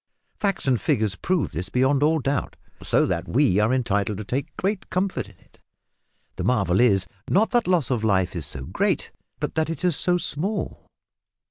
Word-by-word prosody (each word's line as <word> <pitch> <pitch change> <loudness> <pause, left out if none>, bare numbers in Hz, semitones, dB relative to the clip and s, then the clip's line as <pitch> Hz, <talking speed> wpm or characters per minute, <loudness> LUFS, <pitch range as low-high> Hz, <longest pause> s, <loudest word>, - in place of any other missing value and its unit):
Facts 195 -7 -1
and 125 -6 +2
figures 105 -1 +1
prove 170 - -1
this 90 +4 -4
beyond 130 +4 +2
all 155 +2 +3
doubt, 140 -1 -2 0.3
so - - +2
that - - -2
we 125 -7 +3
are 105 +3 +3
entitled 105 -5 0
to 105 - -5
take 135 +8 -2
the 200 +3 0
comfort 185 - -1
of 95 - -21
it. - - -27 0.8
The - - -3
marvel 100 -7 +2
is, 100 -6 +4 0.2
not 215 +6 +3
that 240 -4 +2
loss 170 -8 +2
of 120 -3 0
life 95 -4 +1
is 80 -4 -1
so 70 -3 -2
great, - - -1 0.3
but - - -3
that 160 0 0
it 165 +2 -3
is 175 -4 +2
so 180 +4 +2
small. 185 +6 -3
130 Hz, 190 wpm, -24 LUFS, -, 0.8 s, is